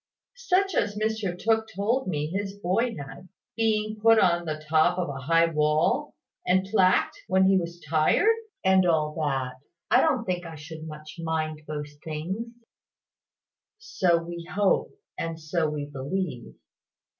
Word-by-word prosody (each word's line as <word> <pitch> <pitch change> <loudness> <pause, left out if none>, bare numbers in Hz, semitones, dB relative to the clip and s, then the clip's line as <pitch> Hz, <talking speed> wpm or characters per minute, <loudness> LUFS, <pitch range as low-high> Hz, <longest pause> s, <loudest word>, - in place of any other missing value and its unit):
"Such 390 -5 +1
as 205 -8 0
Mr 215 -4 -1
Tooke 220 +2 +1
told 225 +6 0
me 150 -5 -1
his 195 +4 -3
boy 210 +5 0
had; 140 +5 -9 0.3
being 215 -1 0
put 225 +1 +6
on 175 -4 +3
the 155 -1 -5
top 160 +3 +3
of 180 -4 -1
a 135 -1 -5
high 165 +5 +4
wall, 150 -1 +1 0.3
and 185 +1 +2
plagued 185 -3 +3
when 190 0 +3
he 195 - +5
was 170 -2 -2
tired: 160 - +3 0.3
and 190 -1 +5
all 155 -2 +2
that. 130 -3 -2 0.3
I 250 - +6
don't 270 -8 +1
think 180 -1 -2
I 165 -2 -8
should 155 +1 -9
much 155 0 -10
mind 160 -2 -2
those 150 -1 -5
things." 170 +9 -4 1.3
"So 195 - +1
we 170 +1 -7
hope, 205 -1 +2 0.3
and 165 -1 -3
so 155 0 -1
we 150 -1 -3
believe. 145 -1 -4
175 Hz, 150 wpm, -26 LUFS, 155-205 Hz, 1.3 s, put